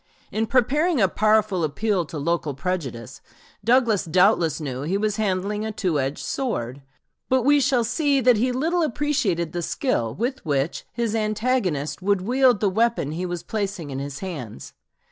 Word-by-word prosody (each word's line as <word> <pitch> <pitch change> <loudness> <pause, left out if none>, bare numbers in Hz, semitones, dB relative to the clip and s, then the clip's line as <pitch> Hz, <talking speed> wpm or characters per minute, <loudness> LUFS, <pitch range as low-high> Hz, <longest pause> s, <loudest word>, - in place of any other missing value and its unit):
In 220 +1 -1
preparing 275 +7 +2
a 195 - +5
powerful 215 -2 +2
appeal 185 +4 0
to 155 - -7
local 150 -1 -1
prejudice, 135 - -4 0.4
Douglas 235 -4 +3
doubtless 175 -2 +3
knew 135 -4 -4
he 170 +7 -1
was 215 +1 -1
handling 205 0 -1
a 220 - -3
two 180 -8 -1
edged 135 +2 -3
sword; 140 - -3 0.5
but 260 -1 +3
we 290 +3 +5
shall 260 -3 +2
see 275 +4 +1
that 250 -2 +4
he 250 +4 +1
little 325 +8 0
appreciated 230 - 0
the 175 - -2
skill 165 - -1
with 250 +4 -3
which 145 0 -1
his 235 -2 -2
antagonist 215 - -1
would 200 0 +1
wield 250 +2 +3
the 210 - +3
weapon 225 -6 +1
he 175 +3 -3
was 175 -1 -4
placing 200 -8 -4
in 135 - -4
his 140 0 -6
hands. 140 - -7
205 Hz, 165 wpm, -23 LUFS, 165-245 Hz, 0.5 s, a